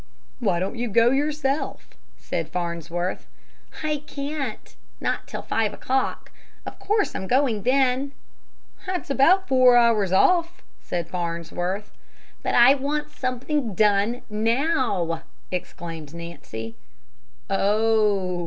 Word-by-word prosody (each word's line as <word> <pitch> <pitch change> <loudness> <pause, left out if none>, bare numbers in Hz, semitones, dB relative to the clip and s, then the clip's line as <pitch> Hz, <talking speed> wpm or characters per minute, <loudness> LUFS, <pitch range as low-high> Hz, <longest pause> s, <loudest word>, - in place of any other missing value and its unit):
"Why 200 -8 +1
don't 195 +6 -3
you 240 -1 -1
go 230 +3 +4
yourself?" 290 +1 -1 0.3
said - - -4
Farnsworth. 175 0 -3 0.6
"I 305 -1 0
can't, 280 -4 -5 0.2
not - - -2
till - - -6
five 220 -2 0
o'clock. 265 +1 -2 0.3
Of - - -8
course 420 0 +1
I'm 190 - -4
going 250 -4 +2
then!" 265 +2 +2 0.7
"That's 365 -6 -3
about 355 +8 +4
four 255 -2 +6
hours 225 -5 +4
off," 340 - +3 0.2
said 170 -2 -3
Farnsworth. 175 +3 -3 0.5
"But - - -1
I 245 +3 +8
want 295 +2 -2
something 255 -2 -2
done 210 +4 +2
now!" 225 - 0 0.3
exclaimed 165 -3 -6
Nancy. 115 -10 -7 0.7
"Oh!" 210 -3 +2
230 Hz, 110 wpm, -24 LUFS, 180-275 Hz, 0.7 s, I